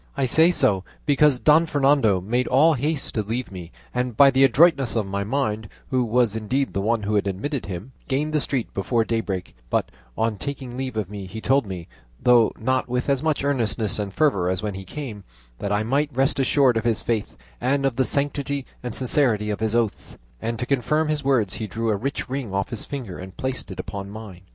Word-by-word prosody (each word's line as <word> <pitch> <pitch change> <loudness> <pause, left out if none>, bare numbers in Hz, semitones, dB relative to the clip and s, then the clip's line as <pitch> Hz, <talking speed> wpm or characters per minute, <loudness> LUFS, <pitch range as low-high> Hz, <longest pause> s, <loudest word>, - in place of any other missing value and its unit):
I 135 - +2
say 160 +7 +5
so 100 - +2 0.2
because 145 -2 +4
Don 155 +4 +5
Fernando 135 -9 +3
made 120 +7 0
all 155 +6 +5
haste 145 +2 -1
to 110 - 0
leave 115 +4 -4
me, 90 -3 -8 0.2
and 125 -2 -2
by 140 -1 +8
the 135 +1 +4
adroitness 135 -1 +4
of 110 -3 +1
my 100 +1 -2
maid, 110 -3 -2 0.2
who 130 -1 +2
was 120 -1 +2
indeed 130 +5 -1
the 100 - -1
one 110 +1 0
who 105 +1 -1
had 100 -1 +2
admitted 115 - -3
him, 95 +6 -6 0.2
gained 150 +3 -1
the 150 - +2
street 130 -5 -2
before 115 +4 0
daybreak; 105 -6 -3
but - - 0 0.3
on 110 -2 0
taking 135 -3 -5
leave 130 -3 -4
of 105 -4 -1
me 100 -1 -7
he 110 +4 -7
told 135 0 +2
me, 90 -3 -6 0.3
though 120 -2 +5
not 130 +2 0
with 125 +2 -1
as 135 -2 +2
much 155 -3 0
earnestness 115 -7 0
and 100 -1 -3
fervour 100 - +2
as 95 +2 -1
when 105 -2 -2
he 95 0 -7
came, 115 -2 -6 0.4
that 100 - -3
I 105 +1 +1
might 140 +6 +1
rest 135 +2 +1
assured 135 -2 +3
of 110 - -1
his 115 -2 0
faith 115 -3 -2 0.2
and 135 +3 +1
of 135 -3 +1
the 130 - +2
sanctity 140 0 -1 0.2
and 125 -2 -3
sincerity 120 -5 +1
of 105 - -3
his 110 0 0
oaths; 115 -3 -1 0.2
and 115 0 -2
to 125 - -3
confirm 150 +4 +1
his 150 -1 -1
words 120 -8 +2
he 110 - -4
drew 115 +1 -1
a - - +2
rich 135 +8 -3
ring 130 -7 -4
off 100 0 -1
his 115 - -5
finger 125 -11 -6
and 95 0 -10
placed 130 0 -4
it - - -8
upon 100 0 -5
mine. 105 -4 -9
120 Hz, 220 wpm, -23 LUFS, 105-140 Hz, 0.4 s, by